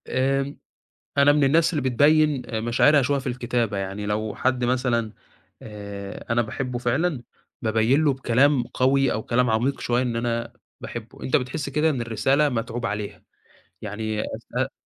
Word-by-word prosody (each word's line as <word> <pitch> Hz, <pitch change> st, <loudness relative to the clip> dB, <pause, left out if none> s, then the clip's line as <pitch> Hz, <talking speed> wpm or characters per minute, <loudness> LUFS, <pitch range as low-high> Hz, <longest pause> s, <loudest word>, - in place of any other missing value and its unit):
آمم. 135 Hz, +2 st, 0 dB, 0.6 s
أنا 140 Hz, +1 st, +6 dB
من 145 Hz, -1 st, +3 dB
الناس 160 Hz, +5 st, +3 dB
اللي 150 Hz, -4 st, -1 dB
بتبيّن 150 Hz, +1 st, +3 dB
آآ 110 Hz, -2 st, -3 dB
مشاعرها 130 Hz, +6 st, +4 dB
شوية 140 Hz, +2 st, +1 dB
في 135 Hz, -, -8 dB
الكتابة 120 Hz, -3 st, -1 dB
يعني 100 Hz, +1 st, -4 dB
لو 105 Hz, +1 st, -2 dB
حد 130 Hz, -1 st, 0 dB
مثلًا 120 Hz, -3 st, 0 dB, 0.5 s
آآ 100 Hz, -2 st, -8 dB
أنا 120 Hz, +1 st, +3 dB
باحبه 125 Hz, +2 st, -4 dB
فعلًا، 130 Hz, +4 st, 0 dB, 0.4 s
بابيّن 115 Hz, +7 st, +2 dB
له 145 Hz, -, +4 dB
بكلام 135 Hz, +1 st, +2 dB
قوي 135 Hz, +2 st, +1 dB
أو 110 Hz, -, -2 dB
كلام 125 Hz, +1 st, +1 dB
عميق 120 Hz, +5 st, 0 dB
شوية 120 Hz, +1 st, +1 dB
إن 120 Hz, -2 st, -2 dB
أنا 115 Hz, 0 st, -2 dB, 0.3 s
باحبه، -, -, -8 dB
أنت 130 Hz, -, +2 dB
بتحس 135 Hz, +3 st, -3 dB
كده 150 Hz, +3 st, +2 dB
إن 135 Hz, -5 st, -2 dB
الرسالة 120 Hz, +6 st, +2 dB
متعوب 120 Hz, -1 st, -3 dB
عليها، 105 Hz, 0 st, -5 dB, 0.6 s
يعني 110 Hz, +1 st, -3 dB, 0.2 s
أثناء 125 Hz, +3 st, -3 dB
125 Hz, 160 wpm, -24 LUFS, 115-135 Hz, 0.6 s, أنا